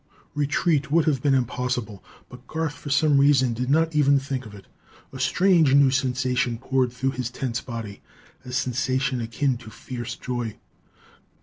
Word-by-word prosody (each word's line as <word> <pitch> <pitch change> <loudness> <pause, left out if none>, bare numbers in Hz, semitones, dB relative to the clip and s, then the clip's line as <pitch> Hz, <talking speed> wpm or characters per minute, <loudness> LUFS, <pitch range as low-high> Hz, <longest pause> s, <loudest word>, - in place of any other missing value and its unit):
Retreat 150 0 0
would 160 +2 +3
have 145 -5 +1
been 140 -1 +3
impossible, 125 -4 -2 0.2
but 125 0 -14
Garth 160 -2 -2
for 145 - -9
some 140 0 +3
reason 135 -3 +4
did 125 +3 -3
not 160 +2 +2
even 140 -2 +4
think 135 -3 -4
of 105 - -12
it. 100 - -13 0.5
A 130 - -8
strange 160 +1 +3
new 140 -2 +5
sensation 125 -3 0
poured 130 0 0
through 130 +2 -1
his 125 -2 -4
tense 125 -1 -3
body, 115 -5 -7 0.4
a 125 - -9
sensation 130 0 -1
akin 120 +3 -1
to 115 -2 -12
fierce 120 +1 -7
joy. 120 -3 -4
130 Hz, 165 wpm, -24 LUFS, 125-140 Hz, 0.5 s, new